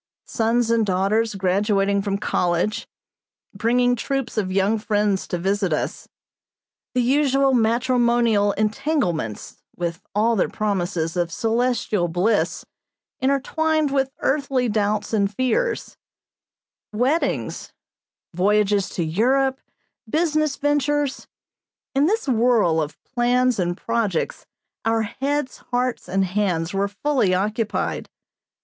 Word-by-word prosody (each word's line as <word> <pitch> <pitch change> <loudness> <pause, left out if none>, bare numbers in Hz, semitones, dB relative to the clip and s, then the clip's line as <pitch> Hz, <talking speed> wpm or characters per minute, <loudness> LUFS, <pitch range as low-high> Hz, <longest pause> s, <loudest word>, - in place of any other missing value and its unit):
Sons 230 0 +1
and 230 -1 +3
daughters 205 +3 +1
graduating 200 +1 +1
from 200 0 -1
college, 180 0 -1 0.7
bringing 245 +2 +2
troops 270 +1 -3
of 200 -4 -1
young 200 +3 +2
friends 205 -2 0
to 175 - -2
visit 195 +1 0
us; 155 - -2 0.9
the 250 - +3
usual 275 +1 +3
matrimonial 235 -2 +2
entanglements, 215 - -2 0.2
with 170 -1 -3
all 225 +3 +3
their 195 - +1
promises 180 -5 -2
of 175 -1 -1
celestial 225 -3 0
bliss 185 +6 0 0.5
intertwined 295 +3 +1
with 270 -1 +1
earthly 270 -3 +1
doubts 210 0 -1
and 200 -2 +1
fears; 455 - -1 0.9
weddings, 255 +10 -1 0.6
voyages 200 +2 +2
to 175 - -2
Europe, 260 +11 +1 0.5
business 310 -1 +1
ventures 290 -1 0 0.7
in 280 +3 +3
this 440 -1 0
whirl 225 -9 +3
of 150 +1 -5
plans 250 -1 +1
and 175 0 -1
projects 225 -7 -2 0.4
our 225 0 +1
heads, 270 +5 -2
hearts, 250 0 -1
and 195 0 +1
hands 180 -3 -1
were 195 +1 +1
fully 205 -2 +1
occupied. 210 +3 -2
220 Hz, 110 wpm, -22 LUFS, 195-255 Hz, 0.9 s, and